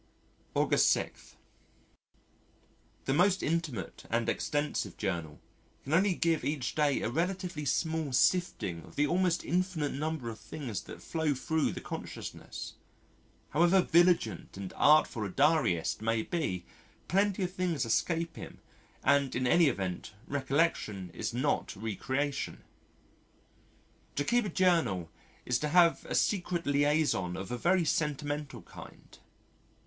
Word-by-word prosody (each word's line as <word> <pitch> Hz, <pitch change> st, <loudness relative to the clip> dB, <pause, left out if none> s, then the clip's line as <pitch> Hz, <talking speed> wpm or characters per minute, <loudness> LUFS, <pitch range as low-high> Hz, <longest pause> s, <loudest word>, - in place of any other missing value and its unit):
August -, -, +4 dB
6. -, -, -2 dB, 1.7 s
The 135 Hz, -, +1 dB
most 185 Hz, +5 st, +3 dB
intimate 150 Hz, -, -3 dB
and 115 Hz, 0 st, 0 dB
extensive 145 Hz, +4 st, -1 dB
journal 85 Hz, -7 st, -3 dB, 0.4 s
can 140 Hz, -, -4 dB
only 190 Hz, +2 st, +4 dB
give 165 Hz, -2 st, +1 dB
each 145 Hz, -3 st, -2 dB
day 150 Hz, -3 st, +1 dB
a -, -, 0 dB
relatively 175 Hz, 0 st, -2 dB
small 160 Hz, +1 st, 0 dB
sifting 125 Hz, -, +1 dB
of -, -, -15 dB
the 145 Hz, -, +3 dB
almost 175 Hz, +2 st, +1 dB
infinite 175 Hz, -4 st, 0 dB
number 150 Hz, -3 st, -3 dB
of 110 Hz, -, -10 dB
things 125 Hz, -9 st, -5 dB
that -, -, -10 dB
flow 160 Hz, -3 st, 0 dB
thro' 160 Hz, +4 st, 0 dB
the -, -, -2 dB
consciousness. -, -, -7 dB, 0.8 s
However 170 Hz, +5 st, +4 dB
vigilant 170 Hz, -, +2 dB
and 95 Hz, -1 st, -6 dB
artful 150 Hz, -6 st, +4 dB
a 100 Hz, -, -3 dB
diarist 135 Hz, -, +2 dB
may 110 Hz, 0 st, +1 dB
be, 95 Hz, -, -2 dB, 0.4 s
plenty 195 Hz, +1 st, +2 dB
of 180 Hz, 0 st, -3 dB
things 175 Hz, -8 st, -1 dB
escape 165 Hz, +8 st, 0 dB
him -, -, -9 dB, 0.5 s
and 140 Hz, -1 st, +3 dB
in 130 Hz, +1 st, 0 dB
any 165 Hz, +6 st, +5 dB
event 95 Hz, -7 st, -3 dB
re 140 Hz, 0 st, -2 dB
collection 130 Hz, -, 0 dB
is -, -, -3 dB
not 125 Hz, 0 st, -1 dB
re 110 Hz, +1 st, -4 dB
creation.... 140 Hz, +6 st, -2 dB, 1.5 s
To 145 Hz, -, 0 dB
keep 240 Hz, +9 st, +2 dB
a -, -, -2 dB
journal 160 Hz, -, +1 dB, 0.3 s
is 125 Hz, -, +1 dB
to 150 Hz, -, -1 dB
have 170 Hz, +2 st, +4 dB
a -, -, -2 dB
secret 180 Hz, -4 st, 0 dB
liaison 145 Hz, -, +1 dB
of 95 Hz, +4 st, -6 dB
a 125 Hz, -, -2 dB
very 175 Hz, 0 st, +3 dB
sentimental 150 Hz, -1 st, -2 dB
kind. -, -, -13 dB
150 Hz, 135 wpm, -31 LUFS, 120-170 Hz, 1.7 s, any